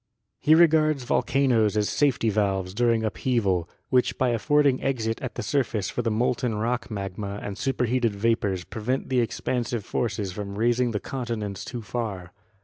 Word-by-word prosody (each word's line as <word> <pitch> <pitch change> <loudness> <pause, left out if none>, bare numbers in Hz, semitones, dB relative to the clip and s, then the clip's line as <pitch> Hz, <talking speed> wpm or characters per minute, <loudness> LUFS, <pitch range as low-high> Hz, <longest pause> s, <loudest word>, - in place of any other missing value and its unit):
He 155 +1 +5
regards 155 -4 +4
volcanoes 120 -5 +2
as 105 -1 +2
safety 130 -6 +2
valves 95 -3 0
during 115 0 +2
upheaval, 105 -6 0 0.2
which 125 -1 +2
by 130 - +2
affording 140 +3 +2
exit 115 -4 -1
at 130 - -5
the - - -4
surface 115 -9 -1
for - - -2
the 115 - 0
molten 120 +1 0
rock 120 +4 -1
magma 100 -1 -5
and 100 - -4
superheated 125 -2 0
vapors 100 -4 0
prevent 125 +7 -3
the 130 -1 +2
expansive 120 -1 -2
forces 105 -4 -2
from 100 +1 -6
raising 120 +2 +2
the 105 -3 -2
continents 110 -7 -4
too 120 -3 -6
far. 100 -5 -4
115 Hz, 155 wpm, -25 LUFS, 105-125 Hz, 0.2 s, He